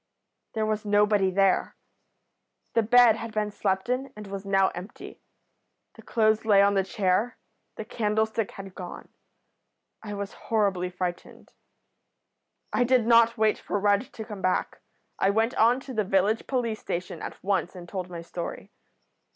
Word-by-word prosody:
There 220 -1 0
was 215 0 -1
nobody 205 -1 +3
there. 195 0 +2 1.0
The 230 - +4
bed 235 0 +6
had 230 0 -6
been 210 -1 -1
slept 190 -1 -1
in, 255 +2 -2
and 210 0 -9
was 195 0 -7
now 195 -1 +3
empty. 180 +5 -10 0.7
The - - -14
clothes 220 -2 +1
lay 210 -3 +5
on 200 0 +3
the 195 -1 +2
chair. 195 +4 0 0.4
The 220 - -6
candlestick 220 0 -1
had 195 -1 -10
gone. 180 -2 -9 0.9
I 210 -2 -6
was 200 0 -5 0.2
horribly 195 -5 +1
frightened. 180 -1 -6 1.2
"I 245 - +3
did 245 -2 +3
not 230 0 +5
wait 220 -1 +2
for 205 - -2
Rudd 205 +4 +1
to 220 - -7
come 210 -3 -8
back. 185 -1 -1 0.4
I 195 - +3
went 225 +4 +1
on 235 +3 +4
to 270 -1 -8
the 215 -2 +1
village 195 +3 +1
police 235 -4 -1
station 180 +2 -5
at - - -8
once 190 -2 -1
and 175 -1 -9
told 185 -1 -5
my 170 -1 -7
story. 170 0 -7
210 Hz, 160 wpm, -26 LUFS, 195-225 Hz, 1.2 s, bed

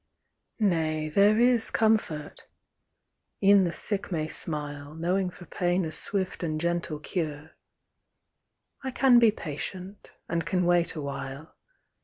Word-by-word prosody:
Nay, 160 -7 0
there 200 +6 +4
is 240 -1 +3
comfort! 215 -9 -1 1.0
E'en 195 -1 +6
the 170 - -1
sick 200 +2 +2
may 155 -3 -2
smile, 145 -2 +1
Knowing 180 +3 -1
for 175 0 -13
pain 175 +1 -1
a 160 - -5
swift 190 +3 0
and 155 -3 -2
gentle 170 -2 -2
cure; 155 -1 -5 1.3
I 265 - -3
can 255 -1 +4
be 230 -2 +5
patient, 185 +3 -7 0.2
and 170 0 -2
can 180 +1 -1
wait 175 -1 +2
awhile. 140 0 -7
170 Hz, 125 wpm, -27 LUFS, 155-195 Hz, 1.3 s, E'en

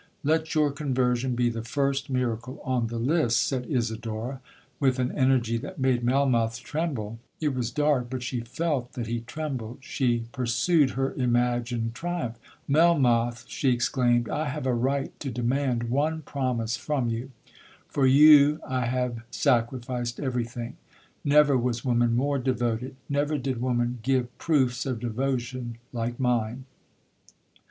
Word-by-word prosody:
'Let 160 +2 +1
your 150 -2 +3
conversion 130 -3 0
be 120 0 +2
the 115 -1 -4
first 135 +4 -1
miracle 125 -1 -2
on 125 -3 0
the 115 +1 -4
list,' 120 -1 +2
said 125 -3 -2
Isidora, 115 0 -2 0.4
with 135 -2 +2
an 125 0 0
energy 130 -4 +2
that 185 +9 -8
made 130 -3 +1
Melmoth 120 -3 +2
tremble—it 135 -2 -3
was 125 -3 -1
dark—but 130 -2 0
she 125 0 -2
felt 125 +1 -2
that 120 - -4
he 115 +1 -2
trembled—she 125 -2 -3
pursued 130 +5 +2
her 135 0 0
imagined 120 -2 0
triumph—'Melmoth,' 130 -4 +1
she 135 - 0
exclaimed, 120 -1 +2
'I 155 - -1
have 140 0 -4
a 130 - +2
right 135 +3 0
to 140 - -4
demand 120 0 -1
one 155 +4 0
promise 125 -5 -1
from 135 0 -1
you—for 125 +3 -4
you 150 +2 +7
I 130 -2 -1
have 125 -2 -1
sacrificed 120 0 0
every 125 -4 -1
thing—never 140 +4 0
was 120 -1 -1
woman 120 -2 +2
more 140 +3 +1
devoted—never 130 +4 -1
did 130 -3 -3
woman 120 -1 0
give 125 0 0
proofs 130 -6 +1
of 125 -3 -2
devotion 120 0 -3 0.2
like 120 +1 -3
mine. 125 0 0
125 Hz, 130 wpm, -26 LUFS, 120-140 Hz, 0.4 s, you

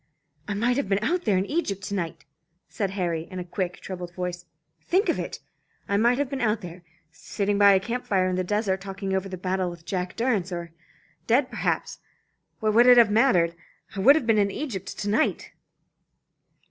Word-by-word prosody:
"I 205 - -2
might 240 +4 +1
have 245 -9 -1
been 200 +1 +1
out 355 +8 0
there 205 -4 +3
in 190 - 0
Egypt 200 - -2
to 200 - -5
night," 170 -5 -4 0.4
said 200 -3 -2
Harry, 170 -3 -2
in 185 - -8
a 180 - -3
quick 180 0 -4
troubled 180 -2 -7
voice. 180 -1 -4 0.4
"Think 380 +5 +1
of - - +1
it! - - -5 0.5
I 200 - 0
might 235 +4 +3
have 285 0 0
been 270 0 -4
out 220 -1 +1
there, 175 -1 -9 0.3
sitting 200 +4 -2
by 200 -1 +7
a 190 - +4
camp 240 +5 -4
fire 185 -2 +2
in 185 - -1
the 185 - 0
desert, 195 -1 -1
talking 195 0 -4
over 190 0 -1
the 185 - -6
battle 185 0 -1
with 170 -1 -11
Jack 180 +1 -3
Durrance; 220 -7 0
or 170 -1 -5 0.6
dead 250 +3 +2
perhaps. - - -2 0.6
What 215 -1 +1
would 240 +3 +6
it 250 -1 +8
have 230 -3 +6
mattered? 205 -8 +3 0.4
I - - -4
might 265 +9 +7
have 315 - 0
been 225 -2 +3
in 200 -1 +2
Egypt 195 -5 -5
to 205 - -4
night!" 220 +10 0
200 Hz, 205 wpm, -25 LUFS, 185-230 Hz, 0.6 s, it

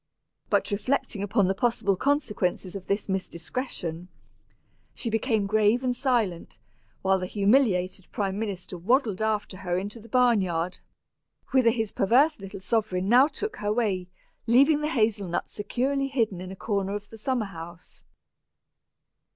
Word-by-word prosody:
But - - +1
reflecting 215 0 -1
upon 205 -1 +2
the 190 - +2
possible 210 -2 +1
consequences 205 -7 -1
of 190 -1 -7
this 200 +1 -1
indiscretion, 180 -2 -4 0.9
she 230 - -3
became 225 -2 +1
grave 215 +4 +3
and 250 -1 0
silent, 235 -10 -1 0.5
while 190 0 +3
the 185 - -3
humiliated 195 -4 +2
prime 195 -1 -2
minister 190 -4 -5
waddled 220 - +1
after 215 -3 -1
her 175 -1 -2
into 205 +5 -4
the 230 +1 -14
barn 245 -3 +4
yard, 175 -1 -2 0.7
whither 260 -3 +5
his 225 -3 -1
perverse 265 +10 +3
little 195 0 -8
sovereign 190 -2 0
now 255 +4 +7
took 405 +9 -5
her 210 0 -1
way, 205 -6 0 0.4
leaving 280 +6 +5
the 300 - 0
hazel 215 - +1
nut 175 0 -3
securely 270 +6 -1
hidden 225 -9 -1
in 185 0 -7
a - - -7
corner 200 -1 -2
of 205 0 -7
the 225 - -10
summer 245 0 0
house. 170 -2 -10
210 Hz, 150 wpm, -26 LUFS, 190-245 Hz, 0.9 s, now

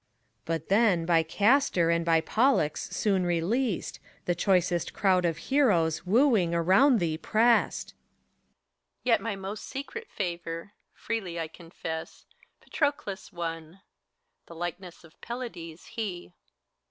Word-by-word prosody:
But 165 -1 -3
then, 200 -5 +3
by 165 -1 +4
Castor 200 - +2
and 170 0 +1
by 165 -1 +3
Pollux 220 - +1
soon 195 -3 +1
released, 180 +6 -1 0.3
The 175 - +1
choicest 175 -1 +1
crowd 185 -3 +2
of 165 -2 0
heroes, 175 - +1
wooing, 215 -6 +3
round 190 - +4
thee 160 -3 -1
pressed. 230 +5 +2
HELENA, - - -45
Yet 225 -3 +1
most 195 +2 -6
my 270 - -5
secret 455 +11 -8
favor, 170 0 -5 0.2
freely 190 -7 -4
I 165 - -2
confess, 165 -1 -8 0.4
Patroclus 285 -11 -2
won, 165 +1 -6 0.7
the 170 - -11
likeness 175 +1 -6
of 165 -1 -19
Pelides 200 -10 -7
he. 195 -6 -5
PHORKYAS. - - -39
180 Hz, 125 wpm, -28 LUFS, 165-225 Hz, 0.7 s, by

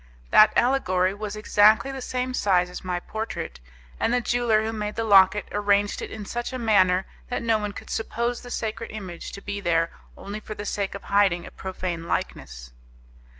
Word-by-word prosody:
That 215 0 +8
allegory 190 -8 +2
was 210 0 -5
exactly 215 +3 +4
of - - -7
the 265 - -6
same 255 0 -2
size 180 -6 +2
as - - -8
my 180 -1 -2
portrait, 220 - -5 0.4
and - - +1
the 245 - +3
jeweller 235 -3 +2
who 220 +1 -2
made 210 -1 -4
the 225 - -1
locket 200 -1 +5
arranged 205 0 +1
it - - -5
in 215 -2 -7
such 240 +5 -4
a 255 - -4
manner 190 -5 +3 0.2
that 245 - -2
no 225 -2 +2
one 210 -1 -3
could - - -10
suppose 235 +2 -2
the 245 - -10
sacred 225 -1 -4
image 185 -6 -7
to 200 - -9
be 200 - -4
there 165 -3 +1 0.3
only 205 +2 -6
for 215 0 -8
the 205 - -6
sake 200 -1 -2
of 200 - -8
hiding 200 -4 +2
a - - -10
profane 180 -3 -5
likeness. - - -4
210 Hz, 195 wpm, -25 LUFS, 190-225 Hz, 0.4 s, That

